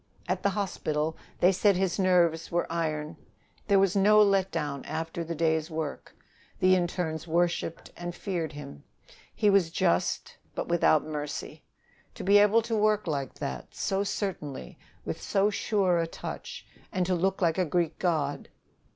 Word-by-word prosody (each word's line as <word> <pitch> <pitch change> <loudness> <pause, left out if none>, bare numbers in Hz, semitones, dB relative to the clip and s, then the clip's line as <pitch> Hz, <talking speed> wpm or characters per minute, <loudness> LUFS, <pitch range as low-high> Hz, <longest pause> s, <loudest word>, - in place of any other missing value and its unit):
At - - -1
the 200 - +2
hospital 160 -5 -1 0.3
they 180 - +6
said 195 +1 +3
his 190 +1 0
nerves 175 -3 +2
were 175 0 +1
iron; 155 -2 -2 0.5
there 200 -1 +4
was 195 0 +3
no 210 +2 +5
let 195 -2 +4
down 145 -5 -3
after 165 +1 -4
the 165 +1 -4
day's 160 0 +1
work. 160 -2 -5 0.4
The 185 0 +5
internes 175 -3 -1
worshiped 170 0 -1
and 175 0 -6
feared 170 -6 -3
him. 140 - -9 0.5
He 210 - +3
was 195 -4 +4
just, 90 - 0 0.2
but - - -3
without 165 -3 +3
mercy. 150 -1 -5 0.5
To - - -7
be 200 +2 +6
able 210 +2 +5
to 230 0 -2
work 215 -1 +2
like 140 -5 -3
that, 65 -2 -6
so 195 +1 0
certainly, 150 - -4 0.3
with - - -4
so 200 +1 +2
sure 195 -4 +1
a 165 - 0
touch, - - -7 0.3
and 185 -3 0
to 185 - 0
look 190 +2 0
like 170 -1 +1
a - - +4
Greek 170 0 -1
god! 155 -6 -1
175 Hz, 160 wpm, -28 LUFS, 160-195 Hz, 0.5 s, they